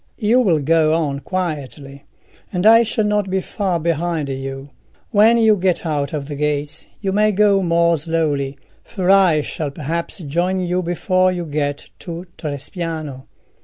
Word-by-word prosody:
You 225 +3 +3
will 190 -10 +3
go 155 +1 +2
on 145 -4 -1
quietly, 145 -5 -5 0.5
and 180 +1 -2
I 225 +1 +8
shall 220 -1 0
not 210 -2 0
be 190 0 0
far 190 -2 -2
behind 165 -2 -1
you. 135 +1 -6 0.4
When 225 +2 +5
you 220 -2 +5
get 180 -2 0
out 145 -3 -1
of 145 -3 -4
the 150 - -5
gates 145 0 -2
you 195 -2 -1
may 210 +2 +3
go 200 -1 +3
more 170 -1 +3
slowly, 145 -3 -1 0.3
for 190 -4 0
I 185 -6 +5
shall 150 0 -4
perhaps 160 +6 -4
join 175 +3 -1
you 180 0 -1
before 185 +1 +1
you 175 -1 -4
get 145 -2 -3
to 170 0 -7
Trespiano." 155 -2 -5
170 Hz, 160 wpm, -19 LUFS, 145-190 Hz, 0.5 s, I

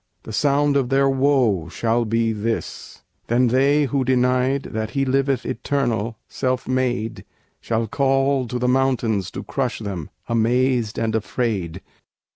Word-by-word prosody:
The 110 - -8
sound 145 +4 +2
of 130 -3 0
their 135 +1 +3
woe 130 - +2
shall 115 +6 0
be 115 0 +1
this: 110 +2 -4 0.2
Then 120 +1 +3
they 140 +4 +3
who 135 -1 0
denied 130 +1 +2
That 110 0 -4
He 135 - +2
liveth 135 -2 +1
Eternal, 120 -5 -1
"Self 130 -1 -2
made," 125 -4 -1 0.4
Shall 115 0 -1
call 135 +2 +1
to 125 - -3
the 125 0 0
mountains 125 -7 +1
to - - -7
crush 130 -4 -2
them; 95 -8 -5 0.2
Amazed 120 0 +1
and 115 -1 -1
affrayed. 100 -6 -2
125 Hz, 140 wpm, -22 LUFS, 110-135 Hz, 0.4 s, their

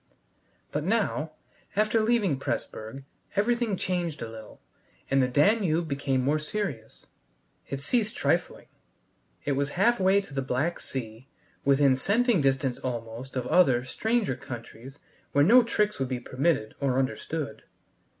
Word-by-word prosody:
But 150 - -2
now, 180 -6 0 0.4
after 215 +2 +3
leaving 215 - +2
Pressburg, 120 -1 -4 0.3
everything 230 0 +1
changed 175 -7 -2
a - - -4
little, 110 -1 -11 0.5
and 135 0 +4
the 130 - +3
Danube 165 - +2
became 140 -2 0
more 145 +4 +2
serious. 150 - -5 0.6
It 140 0 -4
ceased 215 - 0
trifling. - - 0 0.8
It - - 0
was 140 +1 0
halfway 195 -2 +4
to 195 - -13
the 135 - -1
Black 135 +6 -1
Sea, 120 -1 -6 0.4
within 140 -1 +4
scenting 215 - +2
distance 135 -2 +1
almost 120 +1 -5
of 125 -2 -1
other, 130 -6 +4
stranger 220 - 0
countries 120 +1 -9 0.4
where 145 - +5
no 235 +10 +7
tricks 210 -6 0
would 135 -1 -1
be 130 -2 -2
permitted 130 -2 0
or 135 -2 +1
understood. 140 +2 -2
145 Hz, 135 wpm, -27 LUFS, 130-200 Hz, 0.8 s, no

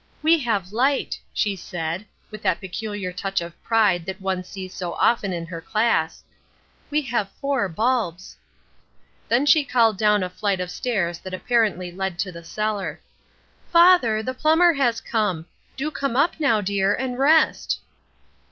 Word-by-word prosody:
'We 325 +1 +5
have 205 -7 -2
light,' 270 +5 +1
she 205 -2 0
said, 175 +2 -5 0.2
with 215 -1 -8
that - - +1
peculiar 200 -1 -5
touch 195 +1 -2
of 170 0 -7
pride 210 -6 +2
that 190 +1 -5
one 190 -1 -2
sees 185 0 -8
so 175 -2 -4
often 215 -5 +2
in 170 -2 -4
her 165 -1 -7
class, 175 -6 0 0.7
'we 300 +1 0
have 235 -6 -1
four 275 -8 0
bulbs.' 205 -2 -1 0.9
"Then 245 +5 +3
she 300 +1 +5
called 230 -7 +2
down 210 -2 +3
a 180 - -3
flight 190 +1 -1
of 180 0 -4
stairs 180 -7 -2
that 185 0 -6
apparently 210 -5 0
led 190 0 -4
to 185 0 -2
the 170 -1 -10
cellar: 210 +3 -3 0.7
"'Father, 335 -11 +5
the 255 - -3
plumber 325 +5 +4
has 245 -5 +1
come. 205 -8 -1 0.3
Do 305 +3 -2
come 275 -5 -2
up 295 +5 +2
now, 230 -8 +3
dear, 200 0 +1
and 255 0 -4
rest.' 310 +3 +3
210 Hz, 160 wpm, -23 LUFS, 185-250 Hz, 0.9 s, We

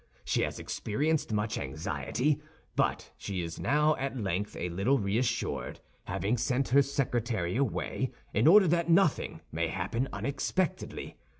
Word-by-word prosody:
She - - +1
has - - -1
experienced 150 +5 -1
much 105 +2 0
anxiety; 80 - -1 0.3
but - - 0
she 95 -3 -3
is 85 -1 -6
now 150 +1 +3
at 135 0 -3
length 100 -2 -2
a 90 - -2
little 100 +11 +2
reassured, 115 +3 -1 0.3
having 110 +5 0
sent 125 +3 0
her 140 +3 +6
secretary 120 -9 -1
away 130 0 -1 0.2
in 110 +7 +3
order 190 +2 +8
that 170 0 +2
nothing 170 -2 +3
may 80 +1 0
happen 100 +10 -2
unexpectedly. 145 +5 -2
125 Hz, 135 wpm, -30 LUFS, 100-140 Hz, 0.3 s, order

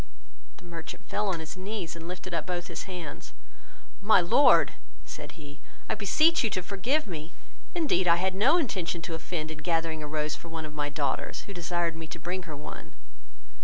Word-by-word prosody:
The - - -15
merchant 170 -2 -7
fell 210 0 0
on 185 -4 0
his 160 0 -6
knees, 185 -3 -4
and 165 0 -7
lifted 180 0 -6
up 165 - -1
both 175 -1 -2
his - - -5
hands: 175 -5 -6 0.7
"My 210 0 +7
Lord 180 +11 +6 0.3
(said - - -8
he,) 145 -2 -11 0.3
I - - +1
beseech 285 - +4
you 225 - +3
to 185 - -1
forgive 235 - +1
me, 165 -4 -6 0.4
indeed 280 - +2
I 170 - +8
had 185 +2 +1
no 245 - +5
intention 180 - -1
to 165 - -3
offend 160 -1 -3
in 155 - -7
gathering 165 0 0
a 150 - -4
rose 150 0 -1
for 170 - -10
one 165 -1 -4
of 150 - -8
my 145 -1 -1
daughters, 145 -2 -1
who 200 - -8
desired 175 -1 0
me 165 0 -6
to 165 - -6
bring 175 +3 -3
her 150 - -4
one." 150 +1 -8
175 Hz, 200 wpm, -29 LUFS, 160-190 Hz, 0.7 s, I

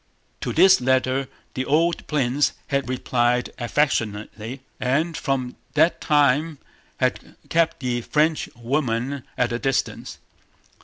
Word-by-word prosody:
To - - -3
this 190 -7 +6
letter 130 +1 +1 0.3
the 130 - -2
old 165 +5 +1
prince 140 -1 +1 0.2
had 140 -3 0
replied 125 -1 +1
affectionately, 115 -2 -1 0.2
and 155 +6 0
from 130 -3 -2 0.2
that 160 +3 +3
time 150 +1 +2 0.4
had - - -1
kept 165 -2 +1
the 125 -2 -1
Frenchwoman 135 -3 -1
at 120 -1 +1
a 120 - -1
distance. 135 0 -2
135 Hz, 110 wpm, -23 LUFS, 125-150 Hz, 0.4 s, this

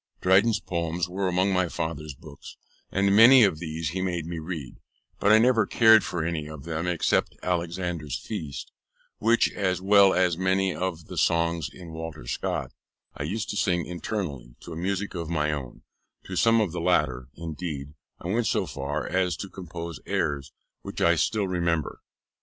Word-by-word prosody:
Dryden's 100 +4 +4
Poems 85 -2 -2
were 95 +2 -2
among 90 +2 +2
my 90 -2 +1
father's 75 -3 -4
books, 75 -1 -12 0.3
and 100 0 +2
many 120 +3 +9
of 95 -7 +2
these 80 -2 -3
he 95 +4 -3
made 85 -3 -2
me 85 0 -5
read, 80 -6 -6 0.4
but 105 - +3
I 110 - +8
never 115 0 +4
cared 110 -2 +6
for 85 -2 -3
any 80 -3 -2
of 75 -3 -9
them 85 +1 -3
except 90 -2 +1
Alexander's 85 -4 -2
Feast, 75 - -6 0.5
which, 115 +2 +3
as 95 -3 -1
well 100 0 +5
as 90 -2 +2
many 95 0 +1
of 90 -3 -3
the - - -5
songs 85 0 +1
in 85 -3 -11
Walter 80 -5 -7
Scott, - - -3 0.4
I - - -7
used 100 +9 -3
to - - -5
sing 85 -4 +1
internally, 85 - -5
to 85 - -9
a - - -7
music 95 +4 -2
of 85 -3 -4
my 75 -2 0
own: 65 -4 -6 0.4
to 95 - -6
some 115 +4 +4
of 100 -6 0
the 85 0 -4
latter, 65 -8 +1
indeed, 75 -3 -6 0.3
I - - -7
went 115 +3 +1
so - - +1
far 70 +2 -4
as 90 -1 0
to 100 - -6
compose 85 -3 -7
airs, 70 -2 -1 0.3
which - - -7
I 85 - +4
still 100 +5 0
remember. 85 -4 -1
85 Hz, 175 wpm, -26 LUFS, 80-95 Hz, 0.5 s, many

